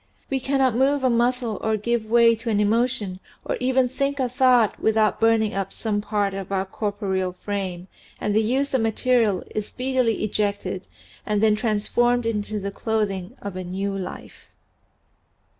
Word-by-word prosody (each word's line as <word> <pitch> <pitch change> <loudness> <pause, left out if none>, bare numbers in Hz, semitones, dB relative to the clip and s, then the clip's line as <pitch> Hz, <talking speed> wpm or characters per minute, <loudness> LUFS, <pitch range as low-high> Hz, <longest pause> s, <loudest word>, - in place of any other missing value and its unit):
We 270 - +1
cannot 265 -1 +1
move 270 +2 +2
a 255 - +3
muscle 240 -2 +1
or 220 0 +1
give 230 +1 -1
way 230 +1 +5
to 230 +1 -5
an 210 -2 +2
emotion 215 -2 0 0.3
or - - -1
even 255 0 +2
think 275 +2 -2
a 260 - +2
thought 250 -3 +3
without 220 -1 +2
burning 225 -1 +3
up 195 -1 -2
some 210 -2 -2
part 205 -2 -1
of 195 -1 -6
our 190 -1 0
cor 205 +2 -3
poreal 190 -3 -2
frame 185 -2 -4 0.3
and 210 - -1
the 220 - +5
used 265 +6 0
up 260 - +2
material 225 -3 +2
is 215 -1 -2
speedily 255 -4 0
ejected 205 -2 -2 0.4
and 210 -1 0
then 215 -1 +5
transformed 240 +2 +1
into 215 -1 -2
the 200 0 -4
clothing 200 -4 -2
of 200 -2 -5
a 185 - -4
new 195 +2 -3
life. 190 -2 -8
220 Hz, 170 wpm, -23 LUFS, 200-245 Hz, 0.4 s, way